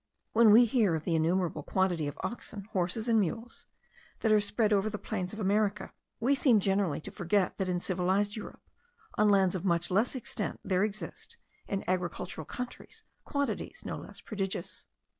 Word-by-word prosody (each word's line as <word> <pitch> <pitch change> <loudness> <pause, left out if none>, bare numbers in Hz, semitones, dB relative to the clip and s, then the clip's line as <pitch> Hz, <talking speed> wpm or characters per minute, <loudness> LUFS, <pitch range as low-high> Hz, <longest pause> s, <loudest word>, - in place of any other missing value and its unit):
When 230 0 +6
we 230 +4 +8
hear 220 -7 +2
of 155 - -3
the 170 - -1
innumerable 165 0 +1
quantity 175 -2 0
of 145 +1 -6
oxen, 215 -3 -4
horses, 190 +4 -1
and 225 -2 +4
mules, 225 +5 -3 0.5
that 220 - +2
are 215 -1 +6
spread 210 +1 +1
over 200 +1 +2
the 210 - -4
plains 185 -4 -4
of 215 - -7
America, 205 0 0 0.3
we 255 +5 +3
seem 260 -5 +4
generally 195 -5 +1
to - - -7
forget 190 +1 0
that 190 -1 0
in 180 -1 0
civilized 190 +3 0
Europe, 215 - -8 0.5
on 210 0 +3
lands 195 -3 +4
of 185 - -3
much 175 -2 +1
less 215 +8 +2
extent, 255 - -4
there 190 -2 +1
exist, 210 0 -5 0.3
in 200 -1 -2
agricultural 180 -3 -2
countries, 250 +8 -7 0.2
quantities 280 -1 -3
no - - -3
less - - -10
prodigious. 195 -3 -4
200 Hz, 175 wpm, -30 LUFS, 180-215 Hz, 0.5 s, we